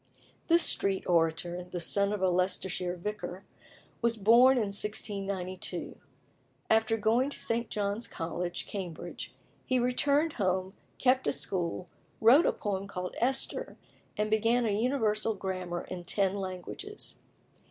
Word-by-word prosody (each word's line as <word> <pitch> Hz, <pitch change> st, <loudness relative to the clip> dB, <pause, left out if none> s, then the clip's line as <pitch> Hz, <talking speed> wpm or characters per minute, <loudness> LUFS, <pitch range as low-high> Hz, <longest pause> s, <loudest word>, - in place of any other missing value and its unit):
This 335 Hz, 0 st, +5 dB
street 195 Hz, -1 st, +1 dB
orator, 170 Hz, +1 st, +1 dB
the 180 Hz, 0 st, -6 dB
son 200 Hz, +4 st, +2 dB
of 205 Hz, -2 st, -2 dB
a 185 Hz, -, +4 dB
Leicestershire 180 Hz, 0 st, -1 dB
vicar, 185 Hz, 0 st, -5 dB, 0.6 s
was 235 Hz, -1 st, +2 dB
born 235 Hz, +5 st, +6 dB
in 210 Hz, -4 st, 0 dB
1692. 195 Hz, -3 st, -3 dB, 0.8 s
After 225 Hz, 0 st, +3 dB
going 230 Hz, +5 st, +2 dB
to -, -, -5 dB
St. 230 Hz, 0 st, -1 dB
John's 205 Hz, +2 st, -2 dB
College, 175 Hz, +2 st, -4 dB
Cambridge, 180 Hz, -5 st, -6 dB, 0.3 s
he 255 Hz, -, +1 dB
returned 280 Hz, +5 st, +2 dB
home, 185 Hz, -2 st, 0 dB, 0.2 s
kept 260 Hz, 0 st, +3 dB
a -, -, +4 dB
school, 180 Hz, -1 st, -1 dB, 0.3 s
wrote 255 Hz, +9 st, +7 dB
a -, -, +4 dB
poem 200 Hz, -1 st, -3 dB
called 180 Hz, -2 st, -5 dB
"Esther," 265 Hz, -, -1 dB, 0.4 s
and 215 Hz, 0 st, 0 dB
began 230 Hz, +3 st, +3 dB
a 215 Hz, -, +1 dB
Universal 220 Hz, -2 st, +1 dB
Grammar 185 Hz, -3 st, -4 dB
in 180 Hz, -1 st, -6 dB
ten 190 Hz, +2 st, +1 dB
languages. 195 Hz, -, -6 dB
200 Hz, 130 wpm, -30 LUFS, 185-230 Hz, 0.8 s, wrote